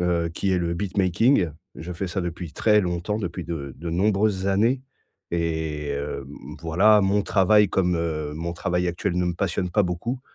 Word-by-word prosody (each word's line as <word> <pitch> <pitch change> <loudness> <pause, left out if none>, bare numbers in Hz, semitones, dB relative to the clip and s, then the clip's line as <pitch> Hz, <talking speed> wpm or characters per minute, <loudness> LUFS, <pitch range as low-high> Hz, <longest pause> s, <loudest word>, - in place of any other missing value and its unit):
heu, 85 -1 +1
qui 95 +3 -1
est 90 - +2
le 85 -1 -1
beatmaking. 95 - +2 0.3
Je 85 +3 -6
fais 90 +2 -4
ça 90 +3 -2
depuis 85 -1 -5
très 105 -1 +3
longtemps, 90 +2 -2
depuis 90 -4 -4
de 70 -5 -5
de 85 +2 -5
nombreuses 95 +2 +1
années 115 +7 +2 0.5
et 80 -3 -2
hem, 70 0 -4 0.4
voilà, 95 +6 +5
mon 100 +2 +2
travail 100 +1 +4
comme, 90 -2 +1
heu, 80 -3 -2
mon 85 +2 -4
travail 90 0 -1
actuel 85 +1 -2
ne 90 0 +1
me 90 - -1
passionne 90 +1 -1
pas 105 - +3
beaucoup, 95 +9 -3
90 Hz, 180 wpm, -24 LUFS, 85-100 Hz, 0.5 s, voilà